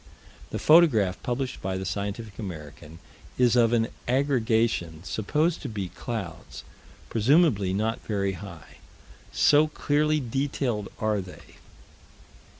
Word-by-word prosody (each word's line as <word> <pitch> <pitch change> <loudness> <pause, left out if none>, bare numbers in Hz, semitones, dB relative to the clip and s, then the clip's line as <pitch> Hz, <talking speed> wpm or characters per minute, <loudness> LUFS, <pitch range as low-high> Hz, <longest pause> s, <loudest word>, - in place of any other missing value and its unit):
The - - -4
photograph 115 - +4
published 130 +1 -3
by 95 0 -2
the 95 - -4
Scientific 100 +3 -4
American 80 -5 -8 0.4
is 125 -1 +4
of 115 -2 +4
an 115 -1 +2 0.2
aggregation 115 - +1
supposed 150 - 0
to 140 - -5
be 100 -4 -4
clouds, 90 -8 -7 0.4
presumably 115 - +3
not 110 +5 -1
very 100 -2 0
high, 85 -4 -10 0.5
so 150 +1 +4
clearly 150 0 +1
detailed 130 -4 -2
are 110 -2 0
they. 90 -1 -13
110 Hz, 115 wpm, -26 LUFS, 95-130 Hz, 0.5 s, photograph